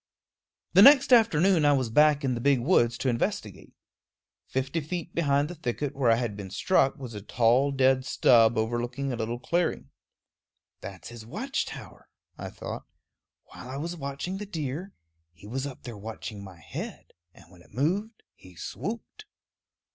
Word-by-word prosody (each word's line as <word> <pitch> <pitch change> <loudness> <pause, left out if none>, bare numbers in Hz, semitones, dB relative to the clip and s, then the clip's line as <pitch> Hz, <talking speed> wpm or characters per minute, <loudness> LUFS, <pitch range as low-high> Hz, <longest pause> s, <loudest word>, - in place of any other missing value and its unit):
The - - +7
next 275 -2 +8
afternoon 190 -7 +4
I 145 0 +5
was 130 -5 0
back 150 +2 +4
in 130 - +1
the 120 - -4
big 140 0 +3
woods 120 -4 +2
to 135 - -3
investigate. 115 -2 -3 0.7
Fifty 135 +5 -2
feet 170 +3 -5
behind 145 -3 +1
the 175 - -7
thicket 145 -2 -4
where 135 -3 +2
I 115 - +6
had 115 -3 -2
been 100 -2 -7
struck 135 - +2
was 130 -5 -8
a 105 - -7
tall 120 +6 +2
dead 130 -1 +3
stub 115 -3 +4
overlooking 120 +4 -2
a - - -2
little 115 +1 -3
clearing. 125 - -1 0.9
"That's 95 -3 -9
his 120 -2 -10
watch 220 - -3
tower," - - -11 0.3
I - - -7
thought. - - -8 0.6
"While 125 - -12
I 135 - -5
was 170 +4 -4
watching 140 +5 -5
the 210 - -6
deer, 160 +2 -5 0.4
he 85 - -17
was 130 +6 -3
up 135 - -10
there 120 -5 -8
watching 105 -1 -7
my 95 -3 -11
head, 75 - -8 0.2
and 85 - -18
when 90 -2 -17
it - - -21
moved 195 - -2
he 90 -1 -17
swooped." 230 - -7
135 Hz, 170 wpm, -27 LUFS, 115-160 Hz, 0.9 s, next